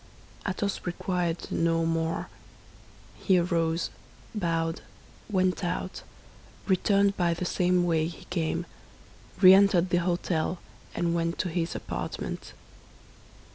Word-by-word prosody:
Athos 200 +1 -2
required 175 -1 -2
no 165 0 +1
more. 165 0 -1 0.9
He 190 -3 +3
arose, 170 -1 0 0.4
bowed, 165 -5 -1 0.5
went 185 -1 +1
out, 180 +1 -3 0.6
returned 200 +1 +3
by 170 -2 +2
the 180 - -3
same 180 0 +2
way 160 -2 +2
he 170 - -10
came, 170 -1 -1 0.8
re 185 -1 +10
entered 190 -2 +4
the 175 - +4
hôtel, 175 -1 0 0.4
and 170 -1 0
went 170 0 -1
to 185 - -1
his 165 0 -2
apartment. - - -5
175 Hz, 110 wpm, -28 LUFS, 165-185 Hz, 0.9 s, re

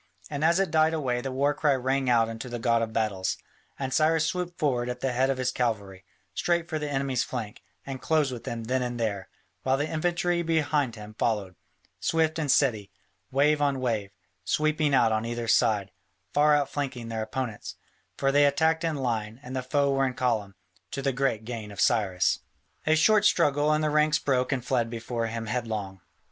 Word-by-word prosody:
And 145 0 -2
as 170 +3 +4
it 195 - +1
died 160 0 +3
away 125 -5 -1
the 135 - -4
war 140 +3 +1
cry 145 -2 +2
rang 130 +1 0
out 115 -2 +4
unto 115 +2 -6
the 120 - -4
God 115 -1 +2
of 115 -1 -2
Battles, 105 -4 -1 0.4
and 135 -1 -3
Cyrus 160 0 +3
swooped 175 +1 -3
forward 125 -5 0
at 125 0 -4
the 135 - 0
head 130 +2 +1
of 135 - 0
his 125 -1 0
cavalry, 100 -6 -2 0.3
straight 170 -1 0
for 155 -3 -3
the 150 -1 -3
enemy's 135 -3 0
flank, 110 -5 -6 0.2
and 135 -2 -6
closed 155 -4 +2
with 120 -2 -7
them 115 -1 -4
then 130 +3 0
and 120 -1 -3
there, 100 -4 -2 0.3
while 130 0 +1
the 145 +2 -1
infantry 175 +2 0
behind 150 -6 0
him 105 0 -10
followed, 105 -5 0 0.5
swift 160 0 +1
and 150 -3 -2
steady, 120 -7 +2 0.4
wave 145 +2 +3
on 140 -2 +1
wave, 110 -6 -1 0.3
sweeping 155 - +1
out 115 -3 +4
on 110 0 0
either 120 0 -3
side, 105 -5 +2 0.4
far 150 0 +5
out 145 -2 +1
flanking 130 -5 -4
their 110 -1 -3
opponents, 110 0 -4 0.4
for 135 0 +2
they 145 +1 +5
attacked 160 +3 +2
in 165 -2 0
line 115 -4 -2
and 130 0 -7
the 130 - -1
foe 140 +2 +1
were 135 0 +2
in 125 - -4
column, 110 -6 -1 0.3
to 135 - -5
the 135 -1 +1
great 125 -4 0
gain 115 -3 -6
of 100 - -10
Cyrus. 95 -6 +2 0.5
A 155 - +5
short 210 +6 +4
struggle, 145 -6 +3
and 155 0 +2
the 155 - +1
ranks 150 0 +3
broke 130 -2 0
and 130 -3 -1
fled 120 -3 +1
before 115 0 -3
him 115 0 -4
headlong. 110 -5 -3
130 Hz, 200 wpm, -27 LUFS, 115-150 Hz, 0.5 s, far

